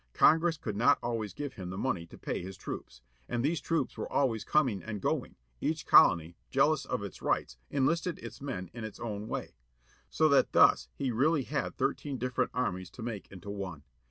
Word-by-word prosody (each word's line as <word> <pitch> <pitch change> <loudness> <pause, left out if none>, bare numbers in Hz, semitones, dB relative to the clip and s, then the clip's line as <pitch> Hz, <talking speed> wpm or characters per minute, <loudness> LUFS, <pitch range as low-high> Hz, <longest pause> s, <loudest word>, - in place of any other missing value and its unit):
Congress 165 +1 +5
could 110 -9 -4
not 115 +4 +5
always 115 -3 -2
give 145 -2 -5
him 90 -3 -7
the 95 - -5
money 95 -9 -1
to - - -13
pay - - -3
his 95 +1 -8
troops. 65 -9 -7 0.3
And 120 +1 0
these 155 0 +1
troops 165 +3 -1
were - - -5
always 115 -6 +1
coming 130 -11 +2
and 105 -2 -5
going, - - -1 0.2
each - - -1
colony, 85 0 +6
jealous - - +3
of - - -2
its - - -8
rights, - - -1
enlisted 165 +5 +1
its 115 +1 -9
men 95 -11 -5
in 120 -1 -7
its 110 -2 -7
own 105 -2 -4
way. - - -4 0.6
So 155 - +3
that 140 - +4
thus - - +5
he 125 - -1
really 140 +5 +2
had 140 +1 -3
thirteen 140 0 -1
different 125 0 0
armies 95 -8 -2
to 110 - -9
make 110 -4 -5
into 100 +1 -8
one. 95 -7 -6
115 Hz, 195 wpm, -31 LUFS, 95-140 Hz, 0.6 s, colony